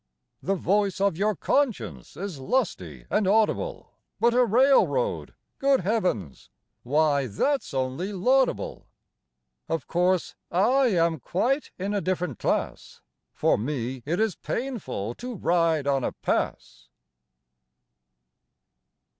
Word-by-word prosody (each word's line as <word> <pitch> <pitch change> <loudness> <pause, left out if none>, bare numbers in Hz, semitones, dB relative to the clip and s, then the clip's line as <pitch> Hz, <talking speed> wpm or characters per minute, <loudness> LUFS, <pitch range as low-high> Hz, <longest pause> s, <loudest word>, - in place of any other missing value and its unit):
The 195 - 0
voice 195 +1 +1
of 200 -3 +2
your 205 +4 +1
conscience 120 - -1
is 185 -5 -5
lusty 95 - -2
and 210 - +2
audible, 220 - +1 0.3
But 235 0 +3
a 250 +1 +5
railroad 275 - +2 0.2
good 275 -3 +3
heavens! 180 - -2 0.3
why, 145 0 +2
that's 275 - -1
only 135 +8 -2
laudable. 250 +7 +1 0.8
Of 165 -4 -2
course, 180 +1 +1 0.2
I 250 +9 +3
am 170 -6 +2
quite 250 - 0
in 195 +3 -3
a 205 - 0
different 180 0 -2
class; - - -2 0.3
For - - +1
me, 130 0 -3
it 165 - -2
is 220 -3 +2
painful 185 - -4
to 250 0 -5
ride 165 -5 +1
on 135 -2 +1
a - - -2
pass! 60 0 -3
185 Hz, 115 wpm, -26 LUFS, 140-230 Hz, 0.8 s, a